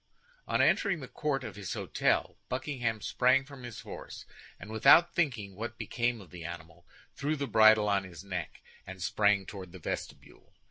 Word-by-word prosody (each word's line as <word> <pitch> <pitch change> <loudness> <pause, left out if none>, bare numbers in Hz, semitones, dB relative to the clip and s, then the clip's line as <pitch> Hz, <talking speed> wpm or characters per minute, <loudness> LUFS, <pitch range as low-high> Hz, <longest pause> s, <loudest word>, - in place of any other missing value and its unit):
On - - +2
entering 195 -5 +2
the 135 - -8
court 140 -2 -2
of 110 -5 -7
his 100 -3 -5
hôtel, - - 0
Buckingham 125 -4 -2
sprang 130 +4 +3
from 140 -2 -12
his 120 -3 -8
horse, - - -9 0.3
and 105 - -9
without 125 +10 +6
thinking 120 - -1
what 115 +4 -6
became 120 -1 -1
of 95 - -15
the 90 -2 -9
animal, 85 +2 -9 0.3
threw 145 +2 -1
the 140 -1 -2
bridle 110 -3 +6
on 100 -1 +2
his 90 -1 -10
neck, 90 -5 -5 0.3
and 95 0 -8
sprang 100 +1 +2
toward 95 -3 -9
the - - -8
vestibule. 85 - -7
110 Hz, 175 wpm, -30 LUFS, 95-130 Hz, 0.3 s, without